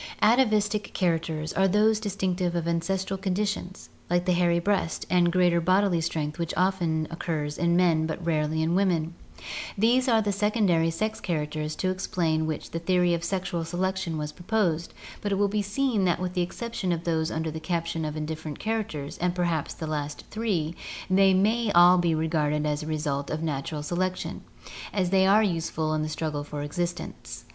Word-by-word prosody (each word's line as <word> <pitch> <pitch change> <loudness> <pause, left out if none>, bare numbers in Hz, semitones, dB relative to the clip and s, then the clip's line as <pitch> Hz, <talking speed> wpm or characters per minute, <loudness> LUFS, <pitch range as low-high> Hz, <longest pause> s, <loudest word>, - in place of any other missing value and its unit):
Atavistic 215 -2 +2
characters 160 -3 -1
are 195 0 +3
those 210 +3 +3
distinctive 185 -4 -1
of 170 -1 -1
ancestral 190 +3 -1
condi 195 +1 0
tions, 190 -2 -5 0.2
like 175 0 +1
the 185 - +2
hairy 175 -1 +3
breast 170 -2 0
and 175 -1 +4
greater 175 -1 +3
bodily 185 0 +3
strength 155 -1 -2
which 170 -1 -2
often 175 -4 +1
occur 165 -3 -2
in 170 0 +1
men 165 -3 +3
but 165 +2 -5
rarely 160 -1 +1
in 165 +2 +1
women. 175 -4 +1 0.6
These 240 +5 +3
are 230 -3 +4
the 205 -1 0
secondary 200 -5 +2
sex 215 +7 -2
characters 155 -2 -2
to 185 - 0
explain 165 -4 0
which 155 - -4
the 165 - -3
theory 180 0 +2
of 170 0 -1
sexual 185 -3 -2
selection 180 0 -2
was 150 0 -3
proposed, 175 -3 -1 0.3
but 205 - -2
it - - +2
will 200 +1 +2
be 210 +1 0
seen 215 +1 0
that 175 -2 +2
with 180 0 -3
the 180 - 0
exception 190 +1 -3
of 170 -1 -1
those 160 -2 0
under 160 0 -2
the 160 - -5
caption 165 -1 -2
of 155 0 -3
indifferent 155 -1 -5
charac 220 -1 -1
ters, 145 -2 -7
and 180 0 0
perhaps 170 -4 -1
the 160 - -5
last 150 -1 -4
three, 195 -8 -1 0.4
they 195 +1 +6
may 215 +3 +2
all 175 +1 +7
be 170 -2 +2
regarded 155 -2 0
as 150 0 -1
the 155 - -6
result 150 -3 -2
of 155 +1 -3
natural 150 0 -3
selection, 185 +4 -2 0.5
as 185 -3 0
they 190 0 +4
are 210 +3 +5
useful 165 -4 -1
in 155 - 0
the 155 - -2
struggle 155 -2 -3
for 145 0 -5
existence. 175 +4 -5
175 Hz, 185 wpm, -27 LUFS, 160-195 Hz, 0.6 s, all